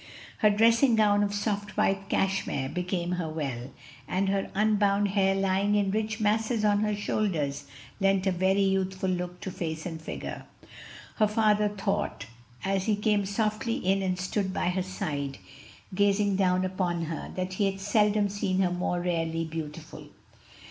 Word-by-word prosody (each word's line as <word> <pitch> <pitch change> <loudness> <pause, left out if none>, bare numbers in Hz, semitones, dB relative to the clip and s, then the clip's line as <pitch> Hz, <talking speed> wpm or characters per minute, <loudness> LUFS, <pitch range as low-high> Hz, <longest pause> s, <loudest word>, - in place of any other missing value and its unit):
Her 215 - +5
dressing 230 +4 +4
gown 205 -2 +4
of 205 0 +1
soft 205 0 -2
white 195 0 +1
cashmere 190 -8 0
became 180 0 -2
her 180 -3 -2
well, 135 -6 -4 0.4
and 190 +1 0
her 195 0 0
unbound 205 -1 +2
hair 195 -1 +2
lying 195 +1 +1
in 200 -2 +2
rich 215 +1 -1
masses 215 +1 +1
on 205 -1 +3
her 210 0 0
shoulders 155 -9 -1 0.3
lent 195 -1 +2
a 190 - +3
very 190 +2 +2
youthful 190 -1 0
look 180 0 -3
to 190 - -4
face 160 -4 -4
and 165 -3 -5
figure. - - -6 0.7
Her 215 - +4
father 210 -1 +3
thought, 195 - -2 0.4
as 195 -1 0
he 215 - +2
came 210 -1 +1
softly 215 +3 -1
in 195 +2 +1
and 185 -1 -1
stood 190 +1 -2
at 180 - +1
her 185 - 0
side, 155 -7 -4 0.6
gazing 200 +1 +2
down 185 -1 +2
upon 180 -2 -1
her, 160 0 -5
that 185 0 -3
he 200 +1 +1
had 195 0 -6
seldom 210 +1 +2
seen 195 -1 -1
her 180 -2 +2
more 180 0 -1
rarely 165 -2 -1
beautiful. 160 0 -7
195 Hz, 160 wpm, -28 LUFS, 180-205 Hz, 0.7 s, Her